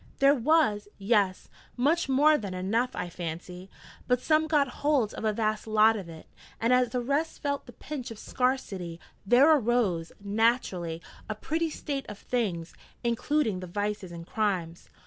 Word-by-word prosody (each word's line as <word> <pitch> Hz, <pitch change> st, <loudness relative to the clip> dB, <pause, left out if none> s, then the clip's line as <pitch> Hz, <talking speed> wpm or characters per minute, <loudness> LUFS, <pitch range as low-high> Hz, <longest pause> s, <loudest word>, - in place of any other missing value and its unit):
'There 275 Hz, +1 st, +6 dB
was 255 Hz, -6 st, +2 dB
yes: 200 Hz, -2 st, +1 dB, 0.3 s
much 295 Hz, +5 st, +2 dB
more 295 Hz, +4 st, +5 dB
than 200 Hz, -9 st, -4 dB
enough, 220 Hz, +7 st, 0 dB
I 180 Hz, -, -3 dB
fancy. 175 Hz, +2 st, -7 dB, 0.4 s
But 250 Hz, -1 st, +3 dB
some 310 Hz, +3 st, +2 dB
got 295 Hz, -3 st, +3 dB
hold 285 Hz, -7 st, +2 dB
of -, -, -7 dB
a 215 Hz, -, +3 dB
vast 215 Hz, 0 st, -1 dB
lot 220 Hz, +1 st, +5 dB
of 190 Hz, -5 st, -6 dB
it, 160 Hz, -1 st, -11 dB, 0.3 s
and 230 Hz, +2 st, +2 dB
as 250 Hz, -1 st, +3 dB
the 250 Hz, +1 st, -1 dB
rest 285 Hz, +6 st, -1 dB
felt 285 Hz, -2 st, -2 dB
the 245 Hz, -, -11 dB
pinch 270 Hz, -4 st, -6 dB
of 225 Hz, -, -8 dB
scarcity, 200 Hz, -10 st, -2 dB, 0.3 s
there 275 Hz, +8 st, +7 dB
arose, 220 Hz, -, +1 dB
naturally, 200 Hz, -6 st, 0 dB, 0.3 s
a 215 Hz, -, -2 dB
pretty 320 Hz, +9 st, -1 dB
state 280 Hz, -2 st, -4 dB
of 210 Hz, -, -7 dB
things 190 Hz, -9 st, -2 dB, 0.3 s
including 235 Hz, -2 st, 0 dB
the 185 Hz, -, -7 dB
vices 205 Hz, 0 st, -3 dB
and 170 Hz, -1 st, -8 dB
crimes.' 180 Hz, -5 st, -2 dB
225 Hz, 165 wpm, -28 LUFS, 190-270 Hz, 0.4 s, there